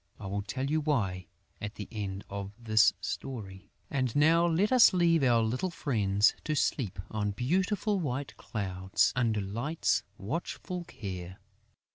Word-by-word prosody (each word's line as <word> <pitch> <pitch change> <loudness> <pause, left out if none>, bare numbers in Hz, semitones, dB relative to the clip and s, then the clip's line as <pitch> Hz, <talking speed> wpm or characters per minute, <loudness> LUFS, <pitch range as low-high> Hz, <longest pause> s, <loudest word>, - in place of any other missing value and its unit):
I 105 - -8
will 100 +1 -2
tell 130 +6 -3
you 155 +2 +1
why 100 - -1 0.3
at 105 +1 -5
the 105 - -6
end 100 -3 -4
of 100 0 -6
this 110 -3 +4
story. 100 -3 -6 0.2
And 130 -4 0
now 165 +4 +5
let 180 +7 +2
us 250 -5 +7
leave 170 -3 +4
our 120 -4 +4
little 125 +11 -1
friends 105 - +2
to 155 - -1
sleep 120 -8 0
on 105 -1 -1
beautiful 190 - 0
white 140 -4 -3
clouds 95 -3 0
under 115 -4 +1
Light's 120 +12 0 0.2
watchful 170 - -4
care. 95 - -7
115 Hz, 145 wpm, -30 LUFS, 100-155 Hz, 0.3 s, us